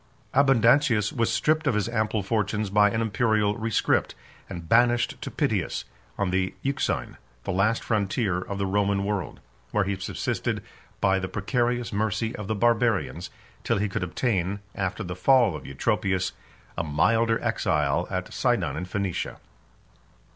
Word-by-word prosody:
Abundantius 125 -4 +4
was 115 -1 +1
stripped 155 0 +1
of 130 - +2
his 105 0 0
ample 110 -2 0
fortunes 105 0 -1
by 105 0 +5
an 110 +2 -1
Imperial 110 -1 +1
rescript, 115 0 0 0.3
and 85 -1 -7
banished 120 +4 +3
to - - -4
Pityus, - - -1 0.3
on 100 -2 0
the 95 0 0
Euxine, 135 0 -1 0.3
the - - -2
last 105 +5 +1
frontier 100 -3 0
of 100 +2 -5
the 100 - -1
Roman 100 0 +1
world; 100 -2 -3 0.3
where 105 - +1
he 100 +1 -1
subsisted 95 0 -3 0.4
by 95 0 +3
the 95 - -3
precarious 120 +4 -1
mercy 110 +2 -1
of 105 - -6
the 110 - -1
Barbarians, 115 -1 +1 0.3
till - - +1
he 105 +1 0
could 100 +1 -3
obtain, 95 +1 -1
after 95 -2 -3
the 90 -1 -5
fall 120 - +4
of 75 - -8
Eutropius, 95 +7 0 0.4
a - - -1
milder 115 +10 +2
exile 70 -2 +1
at - - -4
Sidon, - - +1
in 85 +4 -4
Phoenicia. 95 -1 -3
105 Hz, 150 wpm, -26 LUFS, 95-115 Hz, 0.4 s, by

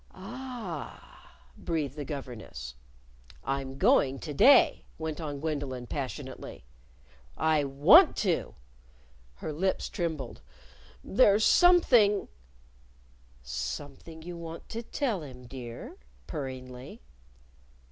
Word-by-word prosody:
"Ah!" 195 - -8
breathed 150 -5 -3
the 150 - -4
governess. 120 - -7 0.7
"I'm 135 -1 -3
going 160 - +4
to 150 - -5
day," 265 - +6
went 160 0 -4
on 145 -3 -4
Gwendolyn, 140 -5 -3
passionately. 130 - -6 0.7
"I 155 -2 +2
want 140 +1 +6
to!" - - 0 0.8
Her 150 - -5
lips 190 +5 -1
trembled. 160 - -4 0.6
"There's 210 -1 +4
something 245 - +5 0.5
" - - -30
"Something 140 - -6
you 175 0 -7
want 165 0 -8
to 230 - -4
tell 235 - -2
him, 125 -4 -10
dear?" 120 -2 -8 0.3
purringly. 130 - -7
145 Hz, 95 wpm, -29 LUFS, 130-175 Hz, 0.8 s, day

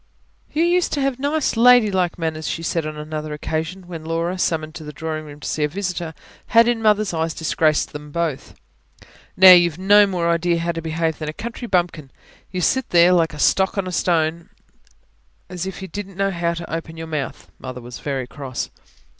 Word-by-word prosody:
"You 315 +2 +1
used 350 +1 +2
to 285 - 0
have 270 -2 -1
nice, 290 0 0
ladylike 215 -7 +4
manners," 160 -2 -3
she 165 - -3
said 165 -1 -1
on 155 0 -6
another 155 0 -5
occasion, 160 +5 -4
when 170 -3 -8
Laura, 165 +2 -2
summoned 155 -3 -1
to 160 - -8
the 150 - -7
drawingroom 155 -1 -6
to - - -5
see 155 - -1
a - - +3
visitor, 175 -1 -4 0.3
had 230 0 +5
in 240 -2 +1
Mother's 215 -3 +2
eyes 160 0 -1
disgraced 155 -1 +1
them 150 0 -8
both. 165 -4 -3 0.8
"Now, 185 0 +10
you've 175 -3 +6
no 205 +2 +6
more 180 -3 -1
idea 170 +1 +1
how 170 +1 -1
to 165 -1 -5
behave 160 0 -2
than 155 -1 -4
a - - -5
country 235 +5 -6
bumpkin. 175 -7 0 0.4
You 180 -1 -3
sit 260 +8 +1
there, 175 +1 +6
like 165 -3 +2
a - - -9
stock 190 +6 +2
or 195 - 0
a - - -4
stone, 165 -1 0 1.0
as 180 0 -4
if 190 0 -7
you - - -5
didn't 195 -1 -7
know 195 0 +1
how 170 -1 -1
to 170 -1 -7
open 165 0 -5
your 165 - -6
mouth." 155 -4 -5
Mother 130 -1 -7
was 120 0 -9
very 135 -3 -3
cross. 130 0 -6
170 Hz, 200 wpm, -21 LUFS, 155-190 Hz, 1.0 s, Now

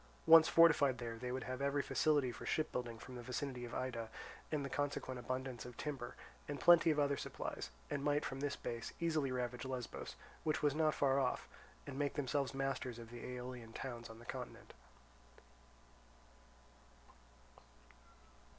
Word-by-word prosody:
Once 165 0 +10
fortified 150 -6 +6
there, 115 -1 -5
they 125 +1 -3
would 130 0 -2
have 130 +3 -4
every 140 0 +1
facility 145 -4 +2
for 110 - -9
ship 155 - 0
building 120 -2 -3
from 130 - -10
the 125 - -6
vicinity 125 0 -3
of 120 - -7
Ida 120 -3 -2 0.4
and 150 -3 0
the - - -1
consequent 140 -2 -2
abundance 130 -1 -3
of 125 -2 -9
timber, 135 -5 -4 0.3
and 145 -1 -3
plenty 170 +2 +7
of 155 - +3
other 145 -1 +3
supplies, - - -4 0.2
and 140 -1 -2
might 145 0 +2
from 135 - -4
this 140 0 -1
base 115 -1 -5
easily 155 -5 +1
ravage 125 -1 -2
Lesbos, 130 -3 -5 0.3
which 155 -1 0
was 145 -2 +4
not 155 0 +2
far 135 -1 +3
off, 130 -2 0 0.4
and 140 -1 -5
make 145 -1 0
themselves 140 -1 0
masters 135 -3 -1
of 115 -1 -9
the 120 -1 -8
Aeolian 125 -2 -6
towns 120 -3 -5
on 115 - -10
the 120 - -13
continent. - - -7
130 Hz, 165 wpm, -38 LUFS, 125-145 Hz, 0.4 s, Once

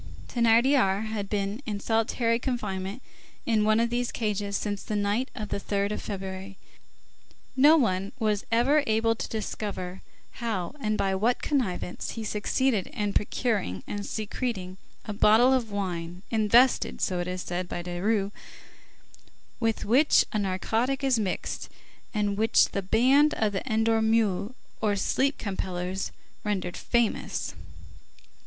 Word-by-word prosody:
Thénardier 235 -3 +3
had 215 -2 -4
been 205 +3 -2
in 205 -2 -2
solitary 230 +2 +1
confinement 205 -4 -3 0.4
in 220 -3 +2
one 215 +1 +4
of 235 0 +1
these 245 0 -1
cages 205 -2 -1
since 205 -2 -3
the 215 - -4
night 205 +6 0
of 215 -5 -5
the - - -2
3d 200 0 -1
of 210 - -3
February. 190 -1 -6 1.0
No 295 +5 +7
one 195 -7 +1
was 215 -4 0
ever 270 +6 +4
able 225 +1 +2
to 225 - -5
discover 200 -4 -4 0.4
how, 220 -4 -2
and 215 -3 0
by 195 -1 +1
what 225 +6 +1
connivance, 220 - -2
he 225 - -5
succeeded 215 +1 0
in 205 -1 -2
procuring, 205 - -1
and 205 0 -4
secreting 205 -3 -4 0.3
a 210 - -4
bottle 220 +5 +5
of 245 -4 0
wine, 180 -3 -4
invented, 230 +3 +4
so 180 -1 0
it 175 - -2
is 180 0 -3
said, 175 0 -3
by 175 - -4
Desrues, 195 +3 0 1.3
with 225 -2 0
which 265 +8 +5
a 215 - +1
narcotic 225 +8 0
is 260 -4 +3
mixed, 195 -4 -3 0.4
and 205 -2 -1
which 225 +1 +4
the 200 - -2
band 260 +10 +4
of 215 -2 0
the 195 - -1
Endormeurs, 220 -1 +2 0.3
or 210 -2 +2
Sleep 270 +8 +1
compellers, 185 -2 -3 0.3
rendered 190 -4 -2
famous. 235 -2 -1
215 Hz, 140 wpm, -27 LUFS, 195-230 Hz, 1.3 s, No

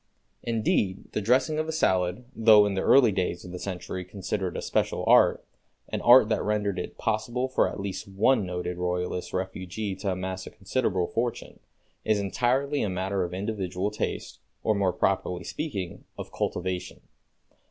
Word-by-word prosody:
Indeed, 110 -4 0
the - - -2
dressing 130 +8 +2
of 155 - -1
a - - -2
salad, 95 - +1
though 110 -2 +7
in 100 - 0
the 95 - -1
early 130 -5 +6
days 90 -2 -2
of 90 - -8
the 90 - -6
century 95 -1 -5
considered 95 0 -4
a - - -3
special - - 0
art, - - +5 0.4
an - - -3
art 120 -2 +8
that 110 - +1
rendered 105 -3 0
it - - -6
possible 120 +3 -1
for 130 - +2
at - - -7
least 100 0 -4
one 105 +4 +2
noted 90 -1 -4
Royalist 90 0 -2
refugee 95 +2 -4
to 95 -1 -1
amass 95 0 -5
a - - -5
considerable 100 -3 -1
fortune, 120 +5 -3 0.4
is 110 -1 +2
entirely 130 +8 0
a 105 - 0
matter 95 +1 -1
of 85 - -4
individual 95 0 -2
taste, 105 - -4 0.2
or, 110 - +3
more 100 -3 +1
properly 90 0 0
speaking, 100 - -5
of - - -7
cultivation. 90 0 -3
100 Hz, 165 wpm, -27 LUFS, 90-110 Hz, 0.4 s, art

